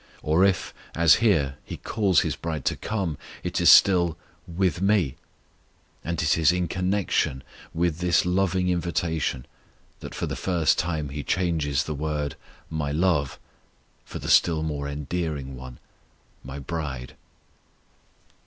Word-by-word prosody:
Or 80 Hz, +4 st, +3 dB
if, 95 Hz, -3 st, +1 dB, 0.2 s
as 80 Hz, -2 st, +6 dB
here, 75 Hz, -12 st, +2 dB
He -, -, -7 dB
calls 100 Hz, -6 st, +2 dB
His -, -, -2 dB
bride 80 Hz, -4 st, -5 dB
to -, -, +1 dB
come, 95 Hz, -9 st, -3 dB, 0.2 s
it -, -, -2 dB
is -, -, +6 dB
still 85 Hz, -4 st, +6 dB, 0.3 s
"with 90 Hz, -1 st, 0 dB
Me," 95 Hz, -9 st, +2 dB, 0.9 s
and 85 Hz, -1 st, -3 dB
it 75 Hz, +2 st, +2 dB
is 80 Hz, +1 st, +5 dB
in 90 Hz, -1 st, -1 dB
connection 90 Hz, -7 st, 0 dB, 0.3 s
with 85 Hz, -1 st, -1 dB
this 90 Hz, -1 st, +2 dB
loving 90 Hz, 0 st, +1 dB
invitation 85 Hz, -7 st, -1 dB, 0.5 s
that -, -, -8 dB
for -, -, -2 dB
the -, -, -4 dB
first 85 Hz, -5 st, +1 dB
time 80 Hz, -4 st, -2 dB
He 70 Hz, +2 st, -5 dB
changes 80 Hz, -3 st, 0 dB
the 80 Hz, -, -4 dB
word 75 Hz, -1 st, -3 dB, 0.3 s
"My 75 Hz, -3 st, -3 dB
love," 80 Hz, -3 st, +1 dB, 0.7 s
for -, -, -8 dB
the -, -, -7 dB
still 80 Hz, -2 st, +4 dB
more 70 Hz, -2 st, -3 dB
endearing 75 Hz, -2 st, -4 dB
one, 65 Hz, -1 st, -10 dB, 0.7 s
"My 65 Hz, +2 st, -7 dB
bride." 70 Hz, -4 st, -5 dB
80 Hz, 140 wpm, -25 LUFS, 75-90 Hz, 0.9 s, as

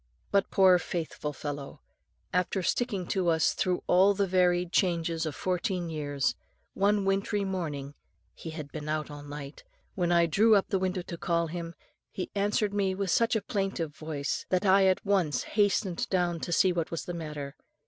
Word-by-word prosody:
But 200 Hz, -1 st, +2 dB
poor 185 Hz, -2 st, +5 dB
faithful 160 Hz, -4 st, -4 dB
fellow, 145 Hz, 0 st, -6 dB, 0.5 s
after 180 Hz, +1 st, 0 dB
sticking 200 Hz, -1 st, 0 dB
to 185 Hz, -3 st, 0 dB
us 160 Hz, -1 st, +3 dB
through 180 Hz, -1 st, -1 dB
all 190 Hz, +3 st, +5 dB
the 200 Hz, 0 st, +2 dB
varied 180 Hz, -1 st, +2 dB
changes 170 Hz, -3 st, +1 dB
of 150 Hz, -, -4 dB
fourteen 180 Hz, -2 st, -2 dB
years, 145 Hz, -3 st, -1 dB, 0.4 s
one 200 Hz, 0 st, +2 dB
wintry 195 Hz, +1 st, 0 dB
morning 150 Hz, -7 st, -4 dB, 0.4 s
he 165 Hz, -, -8 dB
had 155 Hz, -3 st, -7 dB
been 150 Hz, -1 st, -6 dB
out 155 Hz, 0 st, -2 dB
all 145 Hz, 0 st, -8 dB
night 145 Hz, 0 st, -8 dB, 0.3 s
when 175 Hz, -2 st, 0 dB
I 170 Hz, -1 st, +5 dB
drew 215 Hz, +7 st, +4 dB
up 200 Hz, -, +2 dB
the 195 Hz, -, +1 dB
window 185 Hz, -1 st, -1 dB
to 170 Hz, -, -7 dB
call 170 Hz, -1 st, +1 dB
him, 170 Hz, 0 st, -6 dB, 0.3 s
he 185 Hz, -, -5 dB
answered 205 Hz, 0 st, 0 dB
me 195 Hz, -2 st, +1 dB
with 195 Hz, -2 st, -1 dB
such 230 Hz, +4 st, +3 dB
a 215 Hz, -, 0 dB
plaintive 195 Hz, -7 st, -2 dB
voice, 155 Hz, -3 st, -4 dB
that 185 Hz, +2 st, +1 dB
I 190 Hz, 0 st, +5 dB
at 185 Hz, +2 st, +1 dB
once 190 Hz, -7 st, +1 dB
hastened 205 Hz, -3 st, 0 dB
down 175 Hz, -3 st, +1 dB
to 175 Hz, -, -5 dB
see 180 Hz, +2 st, +4 dB
what 170 Hz, -2 st, -2 dB
was 165 Hz, -, -4 dB
the 175 Hz, -, -4 dB
matter. 150 Hz, -4 st, -6 dB
180 Hz, 180 wpm, -29 LUFS, 160-195 Hz, 0.5 s, poor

